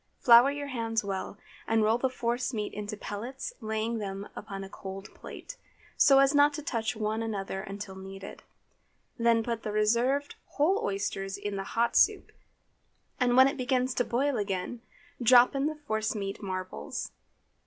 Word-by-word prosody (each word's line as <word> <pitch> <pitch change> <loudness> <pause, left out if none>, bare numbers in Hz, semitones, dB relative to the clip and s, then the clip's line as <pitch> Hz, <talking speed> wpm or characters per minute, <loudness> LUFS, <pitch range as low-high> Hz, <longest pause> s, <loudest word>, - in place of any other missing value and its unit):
Flour 240 +1 +7
your 285 0 -4
hands 225 -3 -1
well 195 0 -4 0.3
and 225 -1 +3
roll 220 +2 +3
the 265 - +1
force 245 0 -2
meat 210 -1 -3
into 210 +1 -5
pellets, 245 - -6
laying 220 +1 -2
them 195 -1 -5
upon 195 -1 -6
a - - -7
cold 195 0 -8
plate, - - -10 0.4
so 275 -2 +6
as 275 +1 +5
not 290 0 +5
to 300 - -6
touch 230 -3 -2
one 215 +1 -2
another 195 -3 -3
until 195 0 -7
needed. 195 +1 -9 0.8
Then 230 -1 +3
put 230 -1 -3
the 215 - -4
reserved 235 +7 +1 0.2
whole 335 +8 +2
oysters 195 0 -2
into 200 0 -4
the 195 - -3
hot 235 +1 +2
soup, - - +3 0.9
and 250 -1 +3
when 260 +1 +8
it 280 +2 -2
begins 255 0 0
to 245 - +1
boil 260 +3 0
again, 200 +3 -3 0.4
drop 245 +1 +6
in 275 +1 0
the 310 - -3
force 220 -8 -2
meat 195 -1 -4
marbles. 185 - -5
225 Hz, 165 wpm, -29 LUFS, 200-255 Hz, 0.9 s, when